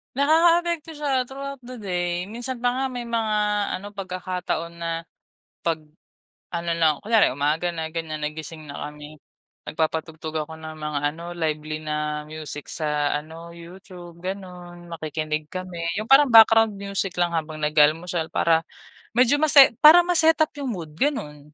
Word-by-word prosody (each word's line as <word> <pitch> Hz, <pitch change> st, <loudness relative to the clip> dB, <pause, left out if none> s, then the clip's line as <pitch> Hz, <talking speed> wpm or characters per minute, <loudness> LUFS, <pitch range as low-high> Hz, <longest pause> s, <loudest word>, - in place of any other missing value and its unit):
Nakakaapekto 330 Hz, +3 st, +3 dB
siya 270 Hz, -4 st, -1 dB
through 270 Hz, +1 st, -8 dB
out -, -, -39 dB
the 250 Hz, +1 st, -8 dB
day. 180 Hz, -4 st, -2 dB
Minsan 240 Hz, +2 st, -6 dB
pa 245 Hz, -, +3 dB
nga 265 Hz, +2 st, -1 dB
may 245 Hz, -2 st, -5 dB
mga 225 Hz, -2 st, -1 dB, 0.4 s
ano, 205 Hz, +2 st, -8 dB
pagkakataon 185 Hz, -3 st, -4 dB
na, 170 Hz, 0 st, -3 dB, 0.7 s
pag-ano 165 Hz, +1 st, -6 dB
na, 155 Hz, -3 st, +2 dB
kunyari 220 Hz, -, +4 dB
umaga 150 Hz, +6 st, 0 dB
na 160 Hz, -2 st, -4 dB
ganyan 160 Hz, -2 st, -5 dB
nagising 155 Hz, +1 st, -6 dB
na 140 Hz, -, -8 dB
kami. 150 Hz, +1 st, -12 dB, 0.5 s
Nagpapatugtog 160 Hz, 0 st, -3 dB
ako 160 Hz, -, -10 dB
ng 155 Hz, 0 st, -8 dB
mga 150 Hz, -1 st, -3 dB
ano, 170 Hz, +2 st, -8 dB
lively 155 Hz, -1 st, -2 dB
na 150 Hz, 0 st, -2 dB
music 155 Hz, -1 st, -7 dB
sa 150 Hz, -2 st, -1 dB
ano, 160 Hz, +3 st, -10 dB
YouTube 175 Hz, 0 st, -12 dB
gano'n, 180 Hz, -2 st, -7 dB
makikinig 155 Hz, -1 st, -4 dB
kami. 185 Hz, -2 st, -6 dB, 0.2 s
Yung 215 Hz, -, -3 dB
parang 270 Hz, -1 st, +7 dB
background 225 Hz, -1 st, +7 dB
music 200 Hz, -2 st, -2 dB
lang 175 Hz, -1 st, +1 dB
habang 155 Hz, -1 st, -3 dB
nag-aalmusal 160 Hz, +3 st, +2 dB
para 165 Hz, -1 st, +2 dB, 0.6 s
medyo 255 Hz, +3 st, +5 dB
mase 285 Hz, -4 st, +7 dB
para 315 Hz, +4 st, +9 dB
ma 355 Hz, -1 st, +2 dB
set-up 320 Hz, -1 st, +4 dB
yung 275 Hz, -3 st, -3 dB
mood, 165 Hz, -5 st, -8 dB
ganun. 150 Hz, -, -3 dB
175 Hz, 150 wpm, -24 LUFS, 155-225 Hz, 0.7 s, para